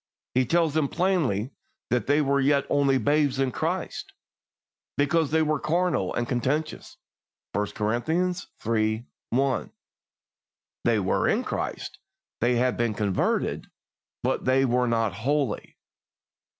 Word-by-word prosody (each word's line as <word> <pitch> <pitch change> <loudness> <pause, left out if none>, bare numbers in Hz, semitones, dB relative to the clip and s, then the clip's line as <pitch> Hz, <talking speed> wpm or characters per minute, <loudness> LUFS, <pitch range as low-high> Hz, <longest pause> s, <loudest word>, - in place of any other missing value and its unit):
He 130 -1 +2
tells 165 0 +2
them 155 -2 +2
plainly 150 - 0 0.4
that 125 0 +1
they 145 +2 +4
were 140 0 +2
yet 140 0 +3
only 140 -2 +3
babes 145 0 +2
in 135 -1 +1
Christ, - - -3 0.8
because 145 +2 +2
they 160 +1 +3
were 155 -1 0
carnal 160 - 0
and 120 0 -1
contentious 135 +6 -2 0.6
(I 105 - +1
Cor. 105 +1 -1
iii. 120 - -1 0.3
I). 135 +1 0 1.1
They 115 -2 +3
were 95 -2 +1
in - - +1
Christ, - - -4 0.4
they 120 +1 +2
had 125 +1 +1
been 115 -3 0
converted, 100 -2 0 0.6
but - - 0
they 130 +1 +4
were 125 0 +2
not 115 -4 +1
holy. 130 +3 -1
135 Hz, 125 wpm, -26 LUFS, 115-150 Hz, 1.1 s, they